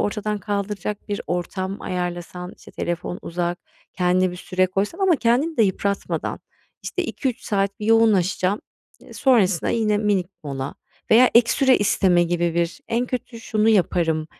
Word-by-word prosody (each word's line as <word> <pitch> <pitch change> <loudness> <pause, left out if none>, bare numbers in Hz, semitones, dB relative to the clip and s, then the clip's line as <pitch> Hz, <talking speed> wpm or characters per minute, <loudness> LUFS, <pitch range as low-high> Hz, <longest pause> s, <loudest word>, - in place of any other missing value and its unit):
ortadan 210 0 -1
kaldıracak 205 0 -4
bir 205 -1 -2
ortam 185 +4 -3
ayarlasan, 180 0 -4
işte, - - -14
telefon 175 +1 -4
uzak, 175 +1 -2 0.4
kendine 180 0 +2
bir 180 - -8
süre 185 +1 0
koysan 195 - -2
ama 380 -4 +3
kendini 260 +7 +1
de 225 - +5
yıpratmadan. 200 0 -1 0.4
İşte, 365 - -2
2-3 260 -7 -3
saat 200 +1 -1
bir 210 - -3
yoğunlaşacağım, 205 -3 +3 0.4
eee, - - -15
sonrasında 205 - +2
yine 215 -2 +1
minik 205 -4 +1 0.2
mola 135 -1 -4 0.4
veya 245 +3 +7
ek 235 0 +6
süre 265 -2 +4
isteme 190 -3 +3
gibi 170 -1 0
bir 170 0 -1
"En 240 +2 0
kötü 245 -2 -5
şunu 220 -1 +1
yaparım, 170 -6 +2
200 Hz, 150 wpm, -22 LUFS, 180-225 Hz, 0.4 s, veya